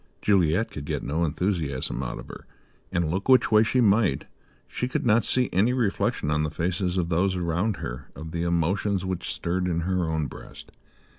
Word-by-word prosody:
Juliet 95 0 +2
could 75 - -7
get - - -3
no 80 +5 -1
enthusiasm 80 -4 -1
out - - -4
of - - -9
her; - - -11 0.4
and, 85 -2 0
look 95 +8 -3
which 130 -2 +5
way 110 0 +6
she 120 +3 +2
might, 100 - +3 0.4
she 125 - -3
could 130 - -2
not 115 0 +4
see 125 -1 +1
any 105 +7 +3
reflection 105 -10 0
on 75 0 +1
the 75 - 0
faces 90 +3 -1
of 85 -2 0
those 90 +3 +1
around 90 +4 0
her 65 +3 -7
of 80 +3 -8
the 85 0 -3
emotions 90 +3 0
which 95 -1 -3
stirred 90 +1 -1
in 85 -1 0
her 90 -1 0
own 80 -1 0
breast. 65 - -11
90 Hz, 195 wpm, -26 LUFS, 80-100 Hz, 0.4 s, way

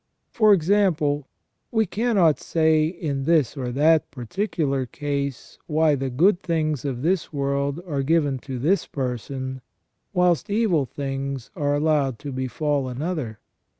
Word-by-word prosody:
For 215 -2 +4
example, 160 -6 +2 0.4
we 220 -1 +2
cannot 195 -6 +2
say 160 -1 +2
in 150 -6 -3
this 155 -4 +2
or 125 -3 -3
that 155 +3 +3
particular 140 - -2
case 140 -1 -4
why 155 -1 +3
the 135 -1 -1
good 175 +9 +3
things 155 -5 -1
of 130 -3 -3
this 175 0 0
world 140 +1 -1
are 145 -6 -2
given 145 -2 +1
to 130 0 -6
this 165 +11 +1
person, 130 0 -4 0.5
whilst 180 +1 +2
evil 200 -9 +2
things 135 -2 -4
are 145 -1 0
allowed 145 -4 +1
to 145 +2 -7
befall 130 +2 -1
another. 135 -4 -3
145 Hz, 135 wpm, -24 LUFS, 135-165 Hz, 0.5 s, For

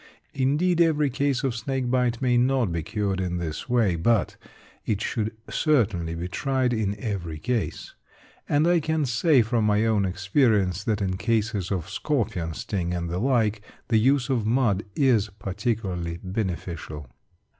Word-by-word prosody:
Indeed, 150 +7 +2
every 150 -4 +3
case 140 +1 0
of 135 -3 0
snake 130 +2 -2
bite 125 -1 +1
may 125 -1 +3
not 125 -4 +2
be 85 -1 -1
cured 100 +1 -2
in 90 -1 -2
this 85 +5 -5
way; 115 -7 +2
but 105 +5 +1 0.5
it 105 -3 -1
should 110 0 -2 0.2
certainly 105 - +1
be 85 +2 -4
tried 130 +5 0
in 105 -3 -1
every 90 -9 -4
case. 120 +5 -3 0.6
And 145 +2 +3
I 175 0 +4
can 160 -1 0
say 125 +2 +3
from 115 0 0
my 105 +1 +2
own 110 -3 +2
experience 95 - +1
that, 105 -2 0
in 95 -1 -1
cases 110 -4 -1
of 90 -4 -2
scorpion 100 - -2
sting 90 -2 -2
and 85 -1 -3
the 90 - -1
like, 110 -4 +1 0.3
the 110 -2 +4
use 130 +2 +3
of 125 -5 +1
mud 110 -3 +1
is 120 -7 +3
particularly 95 -4 -3
beneficial. 90 -6 -4
110 Hz, 155 wpm, -25 LUFS, 95-130 Hz, 0.6 s, I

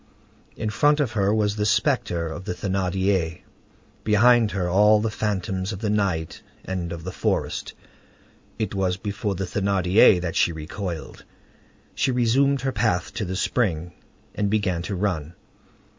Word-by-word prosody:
In 110 -2 -3
front 145 +7 +3
of 135 -6 +1
her 100 -3 +1
was 105 -1 +1
the 105 -1 -1
spectre 110 - +1
of 85 +3 -7
the 90 - -3
Thénardier; 95 -3 -1 0.6
behind 115 +1 +4
her 95 -3 -2
all 105 +4 +5
the 110 +1 -1
phantoms 95 -2 -2
of 100 - -5
the 105 +1 -2
night 95 -6 -1 0.2
and 90 -3 -3
of 85 -1 -6
the 95 - -5
forest. - - -2 0.8
It 110 -1 -2
was 95 -2 0
before 100 0 -3
the 95 - -3
Thénardier 95 0 +4
that 85 -2 -4
she - - +3
recoiled. 80 0 -6 0.7
She 135 - 0
resumed 130 +3 +2
her 135 0 -1
path 105 -8 0
to 105 - -3
the 95 +1 -4
spring, 90 -6 -1 0.4
and 105 -1 -1
began 95 -5 0
to 100 +3 -4
run. 90 -4 -2
100 Hz, 155 wpm, -24 LUFS, 90-110 Hz, 0.8 s, all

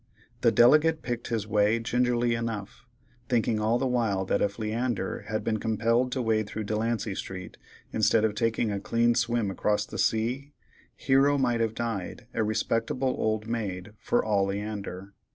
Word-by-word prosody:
The - - +4
delegate 155 +6 +5
picked 120 -1 -3
his 115 -3 -2
way 105 +1 +2
gingerly 120 0 +1
enough, 115 +2 -5 0.4
thinking 115 -3 +1
all 110 +2 +2
the 135 - -1
while 115 -7 0
that 100 - 0
if 100 0 0
Leander 110 -2 -2
had 110 0 -2
been 110 -1 -1
compelled 115 +3 +1
to 130 - -1
wade 110 -2 +1
through 110 +1 -4
Delancey 110 0 -1
street, 95 -1 -7 0.4
instead 110 0 +3
of 110 - 0
taking 115 0 0
a 100 - -2
clean 115 +4 +2
swim 115 -3 0
across 105 +2 0
the - - -7
sea, 125 +6 0 0.4
Hero 140 +1 +3
might 120 -3 +1
have 110 -1 0
died 115 -6 -4
a - - 0
respectable 115 +4 0
old 110 0 -1
maid 105 -4 -4
for 120 - 0
all 100 -3 +2
Leander. 100 -1 -5
115 Hz, 165 wpm, -27 LUFS, 105-120 Hz, 0.4 s, delegate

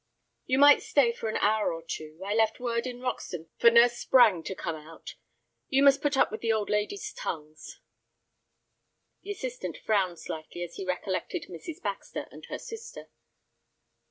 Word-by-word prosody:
"You 260 - +2
might 285 +1 +7
stay 265 -5 +3
for 225 -1 -4
an - - -1
hour 215 +1 +2
or 165 0 -6
two. 155 -1 -7
I 205 - -1
left 220 0 +2
word 235 0 -1
in 245 -1 -7
Roxton 175 -10 -4
for 235 - +7
Nurse 240 +1 +5
Sprange 220 -10 +5
to 190 - -4
come 165 -3 -4
out. 155 +1 -11 0.6
You 270 +1 +3
must 280 0 +6
put 290 -2 +1
up - - +4
with 215 - -6
the 230 - +1
old 215 -2 0
ladies' 210 - -2
tongues." 155 - -7 1.4
The 405 - -12
assistant 485 +4 -5
frowned 190 -5 0
slightly 160 +3 -6
as 170 -1 -7
he 195 - -5
recollected 185 +1 -2
Mrs. 180 - -8
Baxter 200 -1 -4
and - - -11
her - - -5
sister. 455 0 -9
220 Hz, 170 wpm, -28 LUFS, 175-260 Hz, 1.4 s, might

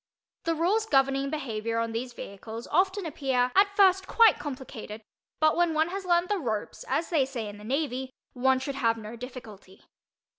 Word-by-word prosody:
The 330 0 +1
rules 400 +7 +1
governing 275 -2 +2
behavior 230 -6 -3
on 230 0 -1
these 240 +3 -4
vehicles 220 +1 -8
often 380 +3 +2
appear 265 -5 0
at 400 +1 +4
first 380 -1 +4
quite 455 -3 +5
complicated, 245 -6 -7 0.4
but 310 0 +4
when 345 -2 +2
one 315 +2 +2
has 385 +1 -5
learned 345 0 +2
the 410 -2 +1
"ropes," 220 -8 -3
as 330 - -1
they 310 -5 +4
say 255 -5 -4
in 205 0 -9
the - - -12
Navy, 265 +1 -2 0.2
one 265 +1 +3
should 265 +2 -3
have 230 -4 +1
no 220 +1 -8
difficulty. 225 -6 -11
270 Hz, 180 wpm, -28 LUFS, 230-340 Hz, 0.4 s, quite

